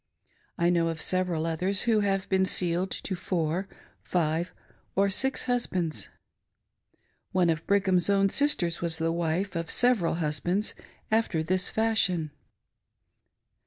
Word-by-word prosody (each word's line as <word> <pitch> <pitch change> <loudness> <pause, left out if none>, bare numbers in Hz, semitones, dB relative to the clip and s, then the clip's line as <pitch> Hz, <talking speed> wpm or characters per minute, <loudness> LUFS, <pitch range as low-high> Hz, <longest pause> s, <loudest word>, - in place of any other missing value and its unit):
I 170 +1 +3
know 170 -1 +2
of 165 -1 -3
several 180 -3 0
others 180 +4 0
who 225 -2 +3
have 195 -2 0
been 190 0 +2
sealed 180 +1 +1
to 190 - -4
four, 175 +1 -2 0.3
five, 170 0 -1 0.4
or 195 +1 +3
six 265 +7 0
husbands! 185 -10 -1 1.2
One 180 -2 +3
of 160 0 -4
Brigham's 190 -2 +2
own 195 0 +3
sisters 190 - 0
was 165 -1 0
the 165 0 0
wife 170 +3 -1
of 165 -1 -3
several 240 -10 +2
husbands 175 +6 -1 0.4
after 215 -7 +1
this 185 +3 +1
fashion. 195 -8 +1
180 Hz, 125 wpm, -27 LUFS, 165-195 Hz, 1.2 s, I